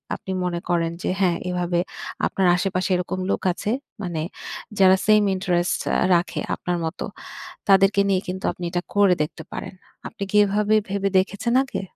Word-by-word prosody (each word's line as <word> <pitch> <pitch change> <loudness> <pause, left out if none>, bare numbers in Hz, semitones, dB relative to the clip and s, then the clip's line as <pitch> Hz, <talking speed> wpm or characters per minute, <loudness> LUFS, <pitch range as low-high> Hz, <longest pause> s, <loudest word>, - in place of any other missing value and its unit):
আপনি 190 - -7
মনে 175 -1 -1
করেন 165 -1 +1
যে - - 0
হ্যাঁ, 175 -3 +3
এভাবে 175 -1 0 0.5
আপনার 190 -2 +1
আশেপাশে 185 0 -1
এরকম 180 +1 -2
লোক - - -1
আছে। 205 - -3 0.3
মানে 170 -4 -3 0.6
যারা 190 -1 +7
সেইম 215 0 +5
ইন্টারেস্ট 180 -1 0
র - - +1 0.3
রাখে 170 +1 0 0.2
আপনার 180 -1 -2
মতো। 160 +4 -4 0.6
তাদেরকে 195 +1 +5
নিয়ে 190 -1 +2
কিন্তু 185 +1 -5
আপনি 180 - -9
এটা 175 0 -1
করে 200 -2 +5
দেখতে 155 +1 -7
পারেন। - - -6 0.3
আপনি 220 - -7
কি 210 - +3
এভাবে 210 +2 +2
ভেবে 200 0 0
দেখেছেন 205 +5 0
আগে? 270 - -4
185 Hz, 165 wpm, -23 LUFS, 175-200 Hz, 0.6 s, যারা